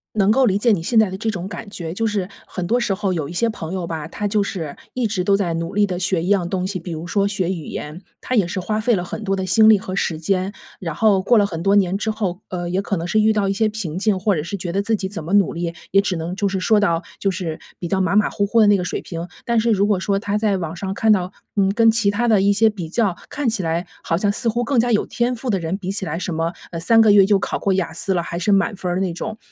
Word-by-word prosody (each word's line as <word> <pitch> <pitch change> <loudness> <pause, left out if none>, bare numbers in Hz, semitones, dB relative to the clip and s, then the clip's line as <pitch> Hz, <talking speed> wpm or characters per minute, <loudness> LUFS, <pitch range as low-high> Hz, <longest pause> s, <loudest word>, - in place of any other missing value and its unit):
能 200 -2 +3
够 260 +4 +4
理 195 -2 +2
解 230 +1 +3
你 165 -4 -1
现 225 +4 +3
在 215 -3 +4
的 185 - -5
这 225 - -2
种 180 -2 -5
感 200 +2 -7
觉， 165 -4 -6
就 225 +5 -1
是 205 -4 -1 0.2
很 180 -2 -5
多 240 - +2
时 220 -4 0
候 195 -1 -1
有 155 -5 -3
一 - - -7
些 230 +7 +1
朋 180 -6 -5
友 180 -3 -3
吧， 160 -1 -5
他 205 +3 -3
就 205 0 +1
是 165 -7 -5 0.2
一 250 -2 0
直 195 -4 -1
都 200 0 +3
在 175 -4 -1
努 165 0 -3
力 205 0 +3
地 185 -2 -3
学 180 -2 0
一 175 - -3
样 190 -4 +2
东 185 -1 -1
西， 190 -2 -3
比 175 +1 -7
如 160 +1 -5
说 200 +2 +1
学 185 -3 -1
语 170 -5 -4
言。 155 +5 -6 0.2
他 255 - -1
也 200 -6 +4
是 185 +2 -3
花 215 +4 -2
费 240 +2 +2
了 175 - -2
很 220 - -6
多 195 -1 0
的 190 - -2
心 220 +4 +5
力 215 - +6
和 190 0 -5
时 165 -4 -1
间， 185 +3 0 0.3
然 165 -4 -4
后 200 +2 +3
过 235 +3 +4
了 205 - +4
很 165 -3 -5
多 200 +1 +3
年 190 -1 +2
之 220 +2 -1
后， 195 -5 -3
呃， 175 -1 -4
也 185 - 0
可 200 - -2
能 170 +1 -3
是 215 +5 +2
遇 220 +1 +4
到 205 -2 +1
一 - - +1
些 215 +2 +1
瓶 190 -7 -5
颈， 200 -1 +1
或 200 -1 +1
者 150 - -2
是 170 +5 -5
觉 175 -2 -4
得 195 - +1
自 220 +1 +1
己 195 - -3
怎 195 -6 -6
么 175 +5 -4
努 200 -3 +4
力， 170 0 -3 0.2
也 195 +1 +5
只 200 -2 -2
能 165 +3 -4
就 200 +1 0
是 190 -1 -2
说 215 +3 +3
到 170 -5 +1 0.2
就 195 - +1
是 170 -3 -4 0.2
比 175 - -4
较 190 +3 0
马 190 +1 +1
马 210 - +3
虎 205 - 0
虎 230 +3 +2
的 210 - +6
那 205 - +6
个 180 - -2
水 180 - -3
平。 170 0 -6 0.2
但 235 -1 +2
是 235 - +2
如 200 -1 +3
果 205 -3 +2
说 195 +1 0
他 205 -1 -1
在 210 -2 +1
网 170 -2 -4
上 190 +2 -4
看 220 +2 +2
到， 185 -3 +2 0.2
嗯， 195 -1 +2
跟 225 +1 +5
其 215 -3 +2
他 240 +4 0
的 215 -4 +4
一 200 - +4
些 220 +2 +4
比 180 -7 -6
较 200 -2 +1
看 290 -4 -1
起 220 -5 -2
来 165 +2 -1 0.2
好 165 - 0
像 205 +2 +1
似 230 +3 -3
乎 240 +2 0
更 245 +1 +1
加 240 +1 +2
有 210 - +3
天 240 +1 0
赋 245 +2 -5
的 200 - +2
人 170 +1 -2
比 190 -2 -5
起 195 -1 -3
来， 165 +1 -3
什 180 - -3
么， 165 +2 -1 0.2
呃， 170 - -4
3 225 +7 +4
个 220 -2 +6
月 195 -2 +7
就 200 -1 +3
考 - - -2
过 195 - 0
雅 185 -3 -1
思 190 +3 -1
了， 175 - +1
还 170 0 -5
是 180 +4 0
满 200 +1 +2
分 180 -1 -3
儿 180 - 0
那 190 -2 0
种， 215 +5 -5
195 Hz, 335 characters per minute, -21 LUFS, 175-210 Hz, 0.3 s, 月